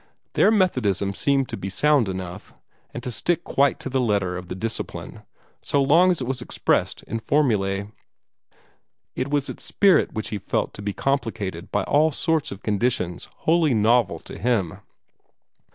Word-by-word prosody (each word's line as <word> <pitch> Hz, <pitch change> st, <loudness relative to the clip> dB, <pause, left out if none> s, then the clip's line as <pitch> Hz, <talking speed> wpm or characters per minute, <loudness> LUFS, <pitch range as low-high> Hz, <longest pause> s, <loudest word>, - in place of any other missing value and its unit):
Their -, -, +4 dB
Methodism 125 Hz, -, +1 dB
seemed 135 Hz, +6 st, +1 dB
to -, -, -4 dB
be 95 Hz, 0 st, -5 dB
sound 140 Hz, +1 st, +2 dB
enough, 95 Hz, 0 st, -7 dB, 0.4 s
and 120 Hz, -, -7 dB
to 125 Hz, -, -4 dB
stick 170 Hz, +8 st, 0 dB
quite 140 Hz, +1 st, +1 dB
to -, -, -4 dB
the 130 Hz, 0 st, 0 dB
letter 100 Hz, -6 st, 0 dB
of 90 Hz, 0 st, -7 dB
the 90 Hz, -, -5 dB
Discipline, 110 Hz, +4 st, -5 dB, 0.4 s
so 140 Hz, -, 0 dB
long 160 Hz, +7 st, +5 dB
as 180 Hz, -, +1 dB
it 130 Hz, -, -3 dB
was 130 Hz, 0 st, -2 dB
expressed -, -, 0 dB
in 115 Hz, -, -4 dB
formulae. 105 Hz, -8 st, 0 dB, 1.2 s
It 130 Hz, +2 st, -2 dB
was 145 Hz, -1 st, 0 dB
its -, -, -7 dB
spirit 195 Hz, -2 st, +3 dB
which 110 Hz, -, -3 dB
he 105 Hz, -, -3 dB
felt -, -, -2 dB
to -, -, -9 dB
be 100 Hz, 0 st, -2 dB
complicated 100 Hz, -8 st, -2 dB
by 105 Hz, -, +1 dB
all 155 Hz, +7 st, +3 dB
sorts 160 Hz, +1 st, 0 dB
of 100 Hz, +1 st, -9 dB
conditions 105 Hz, -5 st, -1 dB
wholly 160 Hz, -5 st, +3 dB
novel 115 Hz, +1 st, +3 dB
to -, -, -9 dB
him. 105 Hz, -8 st, 0 dB
120 Hz, 170 wpm, -23 LUFS, 100-140 Hz, 1.2 s, long